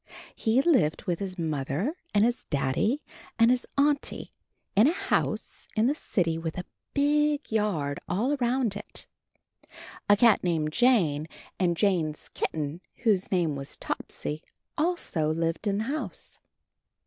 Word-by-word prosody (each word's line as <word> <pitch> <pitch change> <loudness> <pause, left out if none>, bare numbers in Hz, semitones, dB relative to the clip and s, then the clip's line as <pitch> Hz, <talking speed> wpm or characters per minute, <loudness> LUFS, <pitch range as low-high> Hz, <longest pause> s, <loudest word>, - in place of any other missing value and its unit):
He 230 +4 +2
lived 255 - +3
with 175 -4 -1
his 190 -2 -4
Mother 155 - -1 0.2
and 205 +1 +4
his 240 +1 -1
Daddy 145 - 0 0.3
and 230 +1 +6
his 250 -1 +1
Auntie 285 0 +1 0.4
in 215 +6 +6
a - - +4
house - - -1
in 220 0 +3
the 270 - +3
city 165 - -1
with 165 -1 -4
a 180 - -4 0.3
big 295 0 +2
yard 180 -10 0
all 220 - +1
around 245 -5 +1
it. 205 - -5 1.0
A 205 - +7
cat 230 0 +5
called 160 -4 0
Jane 165 - +3 0.3
and 175 -3 +2
Jane's 170 -7 0
kitten, 155 +2 -3 0.2
whose 205 -5 +2
name 170 -6 +1
was 140 0 -7
Topsy, 150 +1 -4 0.3
also 300 - 0
lived 165 +4 -1
in 200 0 +1
the 215 - 0
house. 285 +6 -5
200 Hz, 140 wpm, -27 LUFS, 160-245 Hz, 1.0 s, A